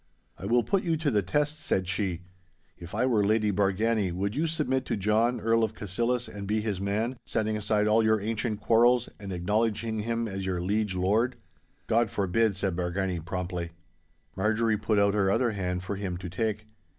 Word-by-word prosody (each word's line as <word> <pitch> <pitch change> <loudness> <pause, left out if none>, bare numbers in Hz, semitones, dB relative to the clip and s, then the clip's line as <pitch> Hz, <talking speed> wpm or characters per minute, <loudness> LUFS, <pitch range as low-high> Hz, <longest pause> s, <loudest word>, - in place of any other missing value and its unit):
'I 95 - -5
will 120 +2 +3
put 195 -1 +1
you 165 -2 0
to 150 -2 0
the 105 -3 +3
test,' 145 - 0
said 95 - -1
she; 95 -3 -1 0.5
'if 85 +3 -9
I 120 +4 +2
were 115 -5 +3
Lady 105 +1 +2
Bargany, 100 +1 +1
would 100 +5 -2
you 160 +3 +1
submit 140 -5 0
to - - -1
John, 110 +5 +2
Earl 115 0 +2
of 110 -1 -1
Cassillis, 120 +5 -1
and 100 -1 -7
be 110 +2 +1
his 105 -3 -2
man, 110 +6 -1
setting 110 0 -1
aside 105 0 +1
all 110 +1 +4
your 110 0 +3
ancient 110 +1 -2
quarrels, 120 +2 +4
and 100 -1 -7
acknowledging 110 +4 0
him 115 +1 -1
as 95 -2 -4
your 95 -2 -1
liege 100 +2 0
lord?' 110 +7 +1 0.5
'God 115 0 +2
forbid!' 100 +2 +1
said 95 -2 -1
Bargany, 90 -1 -2
promptly. 90 -1 -4 0.6
Marjorie 110 +3 +1
put 110 0 0
out 100 0 +4
her 100 -2 +2
other 115 +4 +2
hand 90 -3 -3
for 100 +2 -3
him 95 -3 -3
to 90 0 -6
take. 105 +2 -2
105 Hz, 190 wpm, -28 LUFS, 95-115 Hz, 0.6 s, all